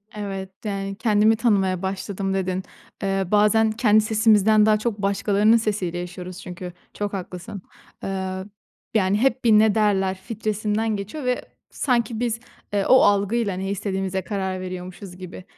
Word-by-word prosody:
Evet, 195 Hz, -2 st, -5 dB, 0.2 s
yani, 195 Hz, -1 st, -3 dB
"Kendimi 215 Hz, 0 st, +3 dB
tanımaya 195 Hz, -6 st, +1 dB
başladım." 195 Hz, 0 st, -3 dB
dedin. 185 Hz, -1 st, -1 dB, 0.4 s
Eee, 195 Hz, 0 st, +1 dB
bazen 210 Hz, +1 st, +4 dB
kendi 215 Hz, -1 st, +4 dB
sesimizden 215 Hz, -1 st, +4 dB
daha 215 Hz, -1 st, +4 dB
çok 215 Hz, -1 st, -2 dB
başkalarının 205 Hz, +2 st, +3 dB
sesiyle 200 Hz, -6 st, -2 dB
yaşıyoruz 180 Hz, +1 st, -7 dB
çünkü. 180 Hz, -1 st, -8 dB, 0.2 s
Çok 205 Hz, -1 st, -3 dB
haklısın. 185 Hz, +1 st, -6 dB, 0.4 s
Eee, 190 Hz, -1 st, -3 dB, 0.6 s
yani, 200 Hz, -2 st, +2 dB
hep 260 Hz, +2 st, +1 dB
bir 230 Hz, -, +4 dB
"ne 215 Hz, -1 st, +5 dB
derler" 195 Hz, -3 st, +2 dB
filtresinden 215 Hz, +1 st, -2 dB
geçiyor 205 Hz, +10 st, -6 dB
ve 250 Hz, 0 st, 0 dB, 0.3 s
sanki 235 Hz, -4 st, 0 dB
biz, 230 Hz, -2 st, -1 dB, 0.3 s
ııı, 200 Hz, -1 st, +1 dB
o 260 Hz, -, +7 dB
algıyla 205 Hz, +1 st, +2 dB
ne 190 Hz, +1 st, -3 dB
istediğimize 190 Hz, -1 st, -2 dB
karar 190 Hz, -2 st, -3 dB
veriyormuşuz 185 Hz, +1 st, -7 dB
gibi 185 Hz, 0 st, -9 dB
200 Hz, 145 wpm, -23 LUFS, 190-215 Hz, 0.6 s, o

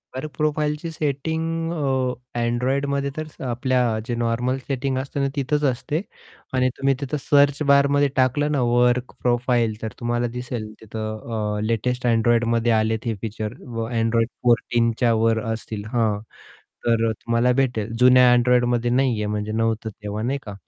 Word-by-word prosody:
Work 145 Hz, +3 st, -5 dB
प्रोफाइलची 150 Hz, +1 st, -1 dB
setting 160 Hz, +3 st, -2 dB
अ, 130 Hz, -4 st, -2 dB
Androidमध्ये 135 Hz, +4 st, 0 dB
तर 155 Hz, -, -3 dB
स 155 Hz, -, -16 dB
आपल्या 130 Hz, +1 st, 0 dB, 0.3 s
जे 120 Hz, -, -1 dB
नॉर्मल 120 Hz, +2 st, 0 dB
सेटिंग 135 Hz, -1 st, -1 dB
असते 135 Hz, +2 st, -4 dB
ना, 140 Hz, -, +2 dB
तिथंच 145 Hz, +2 st, 0 dB
असते 145 Hz, +7 st, -3 dB, 0.5 s
आणि 130 Hz, 0 st, +2 dB
तुम्ही 135 Hz, 0 st, +2 dB
तिथं 140 Hz, +2 st, -2 dB
सर्च 140 Hz, +1 st, +3 dB
बारमध्ये 140 Hz, 0 st, +4 dB
टाकलं 135 Hz, +3 st, +2 dB
ना 140 Hz, -, +1 dB
वर्क 120 Hz, +1 st, +2 dB
प्रोफाइल 120 Hz, -2 st, +1 dB
तर 110 Hz, -, -4 dB
तुम्हाला 120 Hz, 0 st, 0 dB
दिसेल 120 Hz, -3 st, -5 dB
तिथं 110 Hz, 0 st, -4 dB
अ, -, -, -2 dB
लेटेस्ट 125 Hz, +3 st, -1 dB
Androidमध्ये 115 Hz, 0 st, +2 dB
आलेत 110 Hz, +1 st, +1 dB
हे 115 Hz, -, 0 dB
फीचर 110 Hz, -1 st, -4 dB, 0.2 s
व 115 Hz, 0 st, -2 dB
Android 115 Hz, 0 st, +2 dB, 0.2 s
14 120 Hz, -1 st, +2 dB
च्या 120 Hz, -2 st, +3 dB
वर 115 Hz, -1 st, +3 dB
असतील 110 Hz, -2 st, -6 dB
हां, 110 Hz, -4 st, +1 dB, 0.7 s
तर 115 Hz, -1 st, +2 dB
अ, -, -, 0 dB
तुम्हाला 115 Hz, +2 st, +1 dB
भेटेल 115 Hz, -4 st, -1 dB
जुन्या 125 Hz, 0 st, +7 dB
Androidमध्ये 120 Hz, -1 st, +2 dB
नाहीये 125 Hz, -5 st, +1 dB
म्हणजे 105 Hz, 0 st, -2 dB
नव्हतं 115 Hz, 0 st, -1 dB
तेव्हा 105 Hz, 0 st, -6 dB
नाही 135 Hz, +3 st, 0 dB
का. 105 Hz, -, -7 dB
120 Hz, 155 wpm, -23 LUFS, 115-135 Hz, 0.7 s, जुन्या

